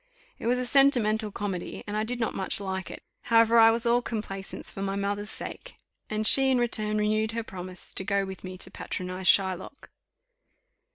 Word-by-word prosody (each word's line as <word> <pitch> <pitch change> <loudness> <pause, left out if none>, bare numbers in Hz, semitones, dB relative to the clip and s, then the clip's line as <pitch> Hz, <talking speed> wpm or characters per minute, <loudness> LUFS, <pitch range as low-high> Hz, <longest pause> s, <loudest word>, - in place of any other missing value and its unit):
It - - -4
was 245 +1 +2
a 250 - -2
sentimental 230 -6 +3
comedy, 195 -3 -5
and 205 - -5
I 215 - 0
did 240 +2 -4
not 225 - -1
much 190 - -2
like 190 -2 -4
it; - - -9 0.2
however, 230 0 +5
I 225 0 +8
was 230 +1 0
all 240 +1 +3
complaisance 205 -5 -5
for 195 - -7
my 195 0 -2
mother's 200 +1 -2
sake, - - -6 0.3
and 215 0 -2
she 270 +4 +6
in 260 - +3
return 215 -3 +1
renewed 215 +1 +1
her 230 0 -2
promise 185 -3 -7
to - - -2
go 200 0 0
with 190 0 -9
me 185 0 -7
to - - -4
patronize 185 0 -5
Shylock. 190 +6 +1
215 Hz, 190 wpm, -27 LUFS, 195-230 Hz, 0.3 s, I